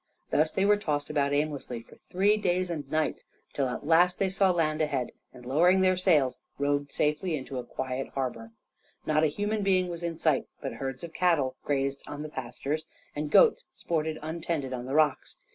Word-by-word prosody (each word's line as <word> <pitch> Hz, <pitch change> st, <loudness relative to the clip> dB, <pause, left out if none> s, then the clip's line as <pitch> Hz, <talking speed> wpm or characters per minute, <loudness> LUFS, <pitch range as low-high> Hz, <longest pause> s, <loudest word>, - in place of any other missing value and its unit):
Thus 155 Hz, +1 st, +3 dB
they 190 Hz, -, +1 dB
were 205 Hz, 0 st, +5 dB
tossed 150 Hz, -7 st, -2 dB
about 140 Hz, -2 st, +1 dB
aimlessly 145 Hz, -5 st, -2 dB
for -, -, -17 dB
three 200 Hz, +3 st, +1 dB
days 185 Hz, -3 st, 0 dB
and 145 Hz, -5 st, -5 dB
nights, 155 Hz, +1 st, -1 dB, 0.3 s
till 135 Hz, -2 st, 0 dB
at 125 Hz, +3 st, -5 dB
last 175 Hz, +3 st, +4 dB
they 195 Hz, -, +1 dB
saw 190 Hz, 0 st, +3 dB
land 160 Hz, -3 st, +1 dB
ahead 140 Hz, -5 st, -1 dB, 0.2 s
and, 125 Hz, -1 st, -14 dB
lowering 175 Hz, +8 st, +4 dB
their 185 Hz, 0 st, +4 dB
sails, 160 Hz, -8 st, +2 dB, 0.2 s
rowed 145 Hz, 0 st, 0 dB
safely 150 Hz, +3 st, 0 dB
into 130 Hz, -2 st, -5 dB
a -, -, -4 dB
quiet 130 Hz, +1 st, -4 dB
harbor. 120 Hz, -4 st, -3 dB, 0.5 s
Not 155 Hz, 0 st, +2 dB
a -, -, +5 dB
human 205 Hz, +7 st, -1 dB
being 185 Hz, -2 st, +2 dB
was 170 Hz, -1 st, -5 dB
in 170 Hz, -1 st, -3 dB
sight, 155 Hz, -4 st, +1 dB
but -, -, -4 dB
herds 135 Hz, +1 st, -5 dB
of 170 Hz, -1 st, -7 dB
cattle 160 Hz, -8 st, +2 dB
grazed 140 Hz, -1 st, -1 dB
on 145 Hz, +1 st, -6 dB
the 155 Hz, -, -6 dB
pastures, 135 Hz, +3 st, -4 dB, 0.3 s
and 150 Hz, 0 st, -3 dB
goats 485 Hz, -, +5 dB
sported 160 Hz, -1 st, -2 dB
untended 160 Hz, -4 st, -3 dB
on 125 Hz, -1 st, -4 dB
the 135 Hz, -, -2 dB
rocks. 155 Hz, -3 st, +1 dB
155 Hz, 195 wpm, -28 LUFS, 140-175 Hz, 0.5 s, were